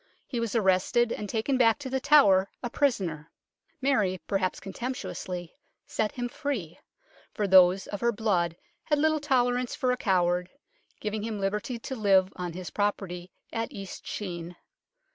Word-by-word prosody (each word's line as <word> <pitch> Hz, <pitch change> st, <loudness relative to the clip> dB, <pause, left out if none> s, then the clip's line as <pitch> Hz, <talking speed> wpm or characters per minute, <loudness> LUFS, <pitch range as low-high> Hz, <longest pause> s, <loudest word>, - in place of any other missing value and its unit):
He 245 Hz, -, -3 dB
was 230 Hz, 0 st, -2 dB
arrested 215 Hz, +3 st, +3 dB
and 210 Hz, -, -4 dB
taken 250 Hz, +4 st, 0 dB
back 230 Hz, -3 st, +5 dB
to 285 Hz, -, -7 dB
The 265 Hz, -, +1 dB
Tower 200 Hz, -10 st, +5 dB
a 240 Hz, -, -3 dB
prisoner. 180 Hz, -, 0 dB, 0.5 s
Mary, 210 Hz, -9 st, +2 dB
perhaps 195 Hz, -2 st, -1 dB
contemptuously, 190 Hz, -5 st, -5 dB, 0.3 s
set 215 Hz, -1 st, -1 dB
him 245 Hz, -1 st, -3 dB
free, 240 Hz, -, -4 dB, 0.6 s
for 210 Hz, -, 0 dB
those 185 Hz, 0 st, +6 dB
of 205 Hz, -, -6 dB
her 235 Hz, 0 st, +3 dB
blood 185 Hz, -7 st, 0 dB, 0.3 s
had 295 Hz, -, +2 dB
little 310 Hz, +1 st, +2 dB
tolerance 250 Hz, -3 st, +1 dB
for 255 Hz, -4 st, +1 dB
a 250 Hz, -, 0 dB
coward, 180 Hz, -4 st, +1 dB, 0.5 s
giving 215 Hz, 0 st, -3 dB
him 215 Hz, -1 st, -3 dB
liberty 210 Hz, +5 st, -2 dB
to 265 Hz, +3 st, -6 dB
live 195 Hz, -4 st, +3 dB
on 180 Hz, -2 st, -4 dB
his 180 Hz, -1 st, -7 dB
property 190 Hz, -3 st, -2 dB, 0.2 s
at 225 Hz, 0 st, -2 dB
East 195 Hz, -1 st, -8 dB
Sheen. 175 Hz, -3 st, -5 dB
210 Hz, 155 wpm, -28 LUFS, 185-245 Hz, 0.6 s, those